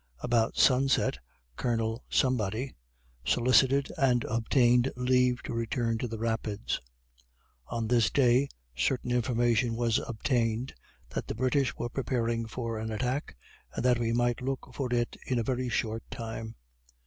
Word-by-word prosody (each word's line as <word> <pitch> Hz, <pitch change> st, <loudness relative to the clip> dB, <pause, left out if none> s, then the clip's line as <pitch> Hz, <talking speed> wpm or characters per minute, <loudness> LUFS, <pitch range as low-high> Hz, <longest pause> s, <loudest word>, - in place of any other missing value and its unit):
About 120 Hz, -2 st, +1 dB
sunset 135 Hz, +1 st, +3 dB, 0.4 s
Colonel 115 Hz, -, -1 dB
solicited 115 Hz, -, +1 dB
and 125 Hz, -3 st, +3 dB
obtained 120 Hz, +2 st, +3 dB
leave 125 Hz, 0 st, +2 dB
to -, -, -5 dB
return 115 Hz, 0 st, -1 dB
to 125 Hz, -, -2 dB
the 115 Hz, -1 st, -5 dB
Rapids. 110 Hz, -2 st, -2 dB, 0.9 s
On 115 Hz, -1 st, -2 dB
this 120 Hz, -2 st, +3 dB
day, 130 Hz, +1 st, +3 dB, 0.3 s
certain 125 Hz, -, 0 dB
information 120 Hz, -1 st, +2 dB
was 115 Hz, -1 st, +2 dB
obtained 120 Hz, +1 st, -1 dB, 0.4 s
that -, -, -4 dB
the -, -, -4 dB
British 130 Hz, +2 st, +1 dB
were 120 Hz, -, -3 dB
preparing 115 Hz, -3 st, -1 dB
for 115 Hz, -1 st, -4 dB
an 110 Hz, 0 st, -4 dB
attack, 125 Hz, -, -2 dB, 0.4 s
and -, -, -2 dB
that 125 Hz, -1 st, +4 dB
we 115 Hz, -1 st, 0 dB
might 120 Hz, +1 st, +1 dB
look 130 Hz, 0 st, -4 dB
for 130 Hz, -2 st, -3 dB
it 120 Hz, -1 st, 0 dB
in 125 Hz, -, 0 dB
a 115 Hz, -, +1 dB
very 125 Hz, +1 st, -1 dB
short 115 Hz, 0 st, -1 dB
time. 115 Hz, -2 st, -6 dB
120 Hz, 135 wpm, -29 LUFS, 115-125 Hz, 0.9 s, that